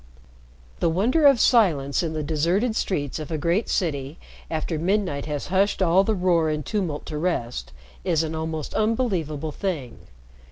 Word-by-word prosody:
The 170 Hz, -, +2 dB
wonder 245 Hz, -, +3 dB
of 275 Hz, -4 st, +5 dB
silence 160 Hz, -, +3 dB
in 165 Hz, -2 st, -2 dB
the 155 Hz, -1 st, -2 dB
deserted 170 Hz, +10 st, +1 dB
streets 145 Hz, -, -2 dB
of 155 Hz, -, -6 dB
a 160 Hz, -, -2 dB
great 170 Hz, +8 st, 0 dB
city, 145 Hz, -4 st, -1 dB, 0.3 s
after 160 Hz, 0 st, -2 dB
midnight 175 Hz, -5 st, 0 dB
has 150 Hz, +1 st, -4 dB
hushed 200 Hz, +2 st, +2 dB
all 185 Hz, +1 st, +4 dB
the 220 Hz, +2 st, 0 dB
roar 175 Hz, -4 st, +2 dB
and 150 Hz, -2 st, -2 dB
tumult 180 Hz, -8 st, -2 dB
to 150 Hz, -2 st, -4 dB
rest, 140 Hz, -, -2 dB, 0.3 s
is 165 Hz, -4 st, +1 dB
an 160 Hz, 0 st, -3 dB
almost 160 Hz, -1 st, -4 dB
unbelievable 185 Hz, -, 0 dB
thing. 150 Hz, -8 st, -4 dB
165 Hz, 160 wpm, -24 LUFS, 150-195 Hz, 0.3 s, of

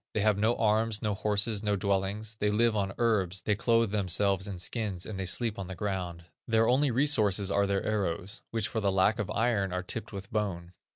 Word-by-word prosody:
They 105 Hz, -, +1 dB
have 105 Hz, -1 st, +2 dB
no 110 Hz, +3 st, +2 dB
arms, 110 Hz, 0 st, +1 dB
no 105 Hz, -1 st, 0 dB
horses, 105 Hz, +1 st, 0 dB
no 105 Hz, -1 st, 0 dB
dwellings; 100 Hz, +2 st, -1 dB
they 105 Hz, -, +1 dB
live 115 Hz, +2 st, +2 dB
on 100 Hz, -2 st, 0 dB
herbs, 95 Hz, -6 st, +1 dB
they 105 Hz, -, +1 dB
clothe 115 Hz, 0 st, +2 dB
themselves 100 Hz, 0 st, +1 dB
in 100 Hz, -2 st, -5 dB
skins, 95 Hz, 0 st, -2 dB
and 100 Hz, -3 st, -6 dB
they 95 Hz, -, -2 dB
sleep 110 Hz, +3 st, +1 dB
on 95 Hz, -, -5 dB
the 95 Hz, -, -6 dB
ground. 90 Hz, -3 st, -4 dB, 0.2 s
Their 115 Hz, -1 st, +3 dB
only 135 Hz, +3 st, +3 dB
resources 110 Hz, -7 st, +2 dB
are 100 Hz, 0 st, +2 dB
their 100 Hz, 0 st, 0 dB
arrows, 100 Hz, 0 st, -2 dB
which 115 Hz, -2 st, -1 dB
for 115 Hz, -, -3 dB
the 100 Hz, -2 st, +1 dB
lack 95 Hz, +4 st, +2 dB
of 105 Hz, -1 st, -2 dB
iron 105 Hz, -3 st, 0 dB
are 90 Hz, 0 st, -3 dB
tipped 110 Hz, +3 st, -5 dB
with 100 Hz, -1 st, -8 dB
bone." 90 Hz, -5 st, -3 dB
105 Hz, 215 wpm, -29 LUFS, 95-110 Hz, 0.2 s, Their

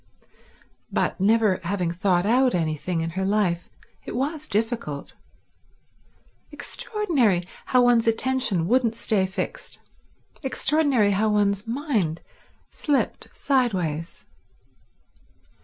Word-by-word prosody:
But, -, -, 0 dB
never 215 Hz, -2 st, +3 dB
having 180 Hz, -1 st, -1 dB
thought 180 Hz, +1 st, +1 dB
out 250 Hz, +2 st, +3 dB
anything 165 Hz, +1 st, -1 dB
in 165 Hz, 0 st, -3 dB
her 190 Hz, +3 st, -3 dB
life, 190 Hz, -4 st, 0 dB, 0.3 s
it -, -, -7 dB
was 300 Hz, +4 st, -2 dB
difficult. 215 Hz, -, -2 dB, 1.4 s
Extraordinary 275 Hz, -, 0 dB, 0.2 s
how 250 Hz, -1 st, +4 dB
one's 240 Hz, -2 st, +4 dB
attention 225 Hz, -6 st, +1 dB
wouldn't 235 Hz, 0 st, +2 dB
stay 200 Hz, -4 st, +1 dB
fixed; 190 Hz, 0 st, -5 dB, 0.6 s
extraordinary 270 Hz, -5 st, +2 dB
how 210 Hz, +3 st, +1 dB
one's 205 Hz, 0 st, +1 dB
mind 230 Hz, -, -1 dB, 0.5 s
slipped 290 Hz, -3 st, -1 dB
sideways. 185 Hz, -, -1 dB
210 Hz, 95 wpm, -24 LUFS, 180-250 Hz, 1.4 s, how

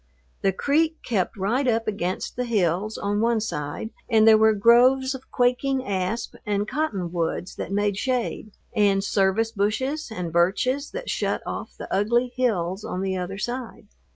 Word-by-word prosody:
The 195 Hz, -, +3 dB
creek 315 Hz, -, +1 dB
kept 210 Hz, -2 st, -1 dB
right 235 Hz, +8 st, 0 dB
up 225 Hz, -1 st, +1 dB
against 185 Hz, -3 st, -2 dB
the 250 Hz, -, -2 dB
hills 205 Hz, -1 st, 0 dB
on 205 Hz, +1 st, -1 dB
one 230 Hz, 0 st, +2 dB
side 150 Hz, 0 st, -4 dB, 0.2 s
and 220 Hz, -2 st, +5 dB
there 220 Hz, -, +9 dB
were 220 Hz, 0 st, +5 dB
groves 255 Hz, +5 st, +5 dB
of 265 Hz, 0 st, -10 dB
quaking 255 Hz, +2 st, +1 dB
asp 195 Hz, +3 st, -2 dB
and 205 Hz, -1 st, -1 dB
cottonwoods 180 Hz, -, -2 dB
that -, -, -5 dB
made 205 Hz, 0 st, 0 dB
shade, 245 Hz, -2 st, -2 dB, 0.3 s
and 200 Hz, -2 st, +3 dB
service 200 Hz, +3 st, +1 dB
bushes 250 Hz, +9 st, -1 dB
and 180 Hz, -7 st, -5 dB
birches 250 Hz, -, +1 dB
that -, -, -5 dB
shut -, -, -1 dB
off -, -, -6 dB
the -, -, -7 dB
ugly 240 Hz, +5 st, +1 dB
hills 200 Hz, -6 st, 0 dB
on 185 Hz, -, -4 dB
the 190 Hz, -1 st, -1 dB
other 185 Hz, +1 st, -4 dB
side. 240 Hz, -1 st, -5 dB
215 Hz, 160 wpm, -24 LUFS, 195-250 Hz, 0.3 s, there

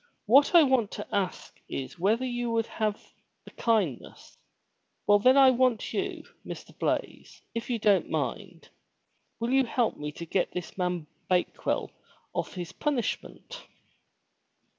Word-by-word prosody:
What 275 Hz, -, +5 dB
I 335 Hz, -, +9 dB
want 260 Hz, -6 st, +2 dB
to 210 Hz, -, -5 dB
ask 195 Hz, -3 st, -2 dB
is 135 Hz, +4 st, -5 dB
whether 220 Hz, +8 st, +2 dB
you 240 Hz, -1 st, -2 dB
would 230 Hz, -1 st, +1 dB
have 215 Hz, -2 st, -3 dB, 0.3 s
the -, -, -12 dB
kindness, 205 Hz, -, -1 dB, 0.4 s
— -, -, -49 dB
Well 205 Hz, 0 st, +5 dB
then 255 Hz, +6 st, +5 dB
I 265 Hz, -1 st, +8 dB
want 255 Hz, -2 st, +1 dB
you, -, -, -2 dB, 0.2 s
Mr. -, -, -9 dB
Blaize, -, -, -3 dB
if 230 Hz, +1 st, -4 dB
you 240 Hz, -, +1 dB
don't 200 Hz, -5 st, +3 dB
mind, 165 Hz, -, -4 dB, 0.7 s
will 230 Hz, +2 st, -1 dB
you 270 Hz, 0 st, +4 dB
help 240 Hz, -1 st, 0 dB
me 150 Hz, 0 st, -5 dB
to 170 Hz, -, -7 dB
get 180 Hz, +3 st, -1 dB
this 180 Hz, -, -6 dB
man 180 Hz, -3 st, -1 dB, 0.2 s
Bake 180 Hz, -1 st, 0 dB
well -, -, 0 dB, 0.4 s
off -, -, -3 dB
his 175 Hz, -2 st, -5 dB
punishment?' 295 Hz, -, -3 dB
220 Hz, 150 wpm, -28 LUFS, 180-250 Hz, 0.7 s, I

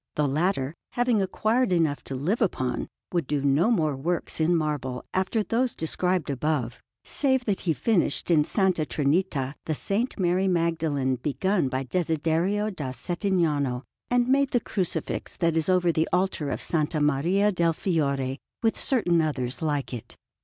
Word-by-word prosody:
The 150 Hz, -1 st, +1 dB
latter, 150 Hz, -1 st, 0 dB, 0.2 s
having 245 Hz, -3 st, +2 dB
acquired 220 Hz, +5 st, +1 dB
enough 160 Hz, -5 st, +1 dB
to 135 Hz, -, -5 dB
live 175 Hz, -, -1 dB
upon, 130 Hz, -, -1 dB, 0.2 s
would 170 Hz, -6 st, -1 dB
do 145 Hz, -2 st, -1 dB
no 145 Hz, +8 st, +3 dB
more 155 Hz, -, +1 dB
works 165 Hz, +7 st, -2 dB
in 170 Hz, +2 st, +3 dB
marble 145 Hz, -5 st, -2 dB
after 190 Hz, +4 st, 0 dB
those 240 Hz, +3 st, 0 dB
described 180 Hz, 0 st, -1 dB
above, 135 Hz, -3 st, -1 dB, 0.2 s
save 265 Hz, -3 st, +1 dB
that 205 Hz, -3 st, 0 dB
he 165 Hz, -, 0 dB
finished 200 Hz, -3 st, +1 dB
in 165 Hz, -, +5 dB
S. 150 Hz, -, -1 dB
Trinita 155 Hz, -, +1 dB
the 160 Hz, -, -1 dB
S. 155 Hz, -, -2 dB, 0.3 s
Mary 185 Hz, 0 st, +1 dB
Magdalene 160 Hz, -7 st, 0 dB
begun 155 Hz, -, 0 dB
by 130 Hz, +1 st, -2 dB
Desiderio 170 Hz, -, 0 dB
da 145 Hz, -9 st, -5 dB
Settignano, 150 Hz, -, 0 dB, 0.3 s
and 245 Hz, 0 st, +2 dB
made 275 Hz, +1 st, +3 dB
the 245 Hz, -, +2 dB
Crucifix 190 Hz, -5 st, -3 dB
that 165 Hz, -1 st, +1 dB
is 160 Hz, +1 st, 0 dB
over 180 Hz, -2 st, +3 dB
the 160 Hz, 0 st, 0 dB
altar 180 Hz, -5 st, 0 dB
of -, -, -3 dB
S. 155 Hz, 0 st, 0 dB
Maria 165 Hz, +8 st, +2 dB
del 170 Hz, -3 st, +2 dB
Fiore, 140 Hz, -7 st, -1 dB, 0.2 s
with 225 Hz, -, +2 dB
certain 180 Hz, -11 st, +3 dB
others 130 Hz, -5 st, -2 dB
like 145 Hz, -4 st, -1 dB
it. 120 Hz, -, -8 dB
165 Hz, 160 wpm, -26 LUFS, 145-190 Hz, 0.3 s, in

